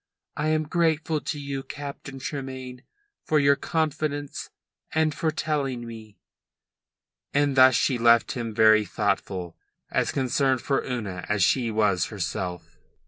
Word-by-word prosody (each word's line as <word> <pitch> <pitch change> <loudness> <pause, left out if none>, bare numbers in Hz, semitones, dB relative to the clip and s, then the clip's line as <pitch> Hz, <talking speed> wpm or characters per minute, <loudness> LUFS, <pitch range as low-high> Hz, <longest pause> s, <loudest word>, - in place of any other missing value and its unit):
I 150 - -1
am 155 0 +2
grateful 160 -1 0
to 150 - -4
you, 140 -1 -4
Captain 140 -1 -8
Tremayne, 130 -2 -6 0.4
for 155 - +1
your 140 -1 +5
confidence 150 -2 -2 0.5
and 160 -1 +2
for 160 - 0
telling 145 -6 -2
me." 110 -3 -10 1.2
And 145 -1 +2
thus 130 -1 +7
she 125 +2 +1
left 115 0 +5
him 120 -2 -4
very 110 0 +5
thoughtful, 90 -2 -2 0.4
as - - +1
concerned 130 -1 +1
for 135 - 0
Una 105 -8 -4
as 105 -2 +2
she 120 +3 +2
was 105 -5 +2
herself. 90 -4 -5
130 Hz, 135 wpm, -25 LUFS, 110-145 Hz, 1.2 s, thus